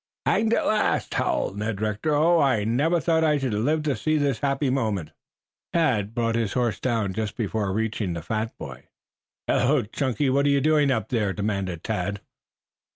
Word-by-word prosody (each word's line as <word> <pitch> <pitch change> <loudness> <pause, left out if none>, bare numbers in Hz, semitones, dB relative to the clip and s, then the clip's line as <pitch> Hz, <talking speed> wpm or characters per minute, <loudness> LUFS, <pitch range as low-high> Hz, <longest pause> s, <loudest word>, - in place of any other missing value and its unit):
"Hanged 225 +1 +2
at - - 0
last!" 215 0 +1
howled 100 - -1
Ned 105 -1 -2
Rector. 110 +8 -1
"Oh, 165 +3 +4
I 130 -7 +2
never 145 +11 +1
thought 160 +2 +1
I 150 -2 +3
should 135 -5 -2
live 150 +9 0
to 145 -3 0
see 155 0 0
this 140 -6 0
happy 140 -1 0
moment!" 110 - -1 0.6
Tad 115 - +1
brought 115 -1 0
his 115 -4 -1
horse 120 -3 0
down 115 -6 -1
just 110 +1 -4
before 105 -3 -1
reaching 110 -2 -2
the 85 -2 -5
fat 110 +4 -3
boy. - - -9 0.6
"Hello, - - +2
Chunky, 130 +4 -1
what 140 +2 +2
are - - +4
you 140 0 +3
doing 150 0 +3
up 115 -4 -1
there?" 105 -6 0
demanded 100 -5 -3
Tad. 100 +3 -2
115 Hz, 180 wpm, -25 LUFS, 105-145 Hz, 0.6 s, Oh